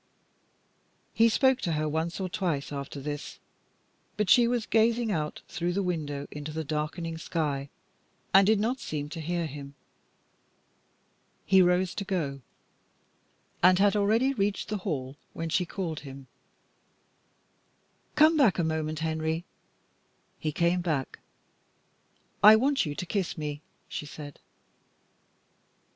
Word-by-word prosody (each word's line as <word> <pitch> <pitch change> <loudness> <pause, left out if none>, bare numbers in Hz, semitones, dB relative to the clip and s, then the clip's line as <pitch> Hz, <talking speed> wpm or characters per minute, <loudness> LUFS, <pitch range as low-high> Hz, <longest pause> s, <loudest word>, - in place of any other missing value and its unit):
He 230 0 +5
spoke 260 +3 +3
to 170 - -1
her 155 0 0
once 160 +4 -2
or 190 - -2
twice 170 -7 -2
after 140 0 -5
this, 145 +1 -6 0.8
but 210 -3 +1
she 240 -1 +7
was 240 -2 0
gazing 230 0 +2
out 150 -5 -3
through 175 +2 -2
the 200 +2 0
window 150 -6 -3
into 150 +1 -6
the 160 +1 -3
darkening 160 +2 -3
sky, 145 -5 -2 0.6
and 195 0 +7
did 220 -1 +4
not 240 +5 0
seem 150 -6 -4
to 160 +2 -6
hear 170 +1 -1
him. 140 -2 -8 1.7
He 190 0 +6
rose 180 0 +2
to - - -4
go, 155 -9 -2 1.2
and 180 +1 +6
had 205 +2 +4
already 220 +6 +2
reached 205 -3 -1
the 210 -1 -2
hail, 140 -7 -4 0.2
when 165 0 -4
she 180 +2 +1
called 170 -6 -4
him 135 -1 -10 1.9
"Come 310 +2 +6
back 265 - +4
a 175 - +1
moment 160 -1 -2
Henry." 160 +1 -1 0.9
He 155 - -2
came 170 +3 +1
back. 155 -7 -2 1.2
"I 210 +1 +10
want 270 - +2
you 145 - -4
to 180 - -4
kiss 190 -1 -2
me," 150 -1 -4 0.3
she 150 - -6
said. 145 -1 -9
170 Hz, 135 wpm, -28 LUFS, 150-200 Hz, 1.9 s, I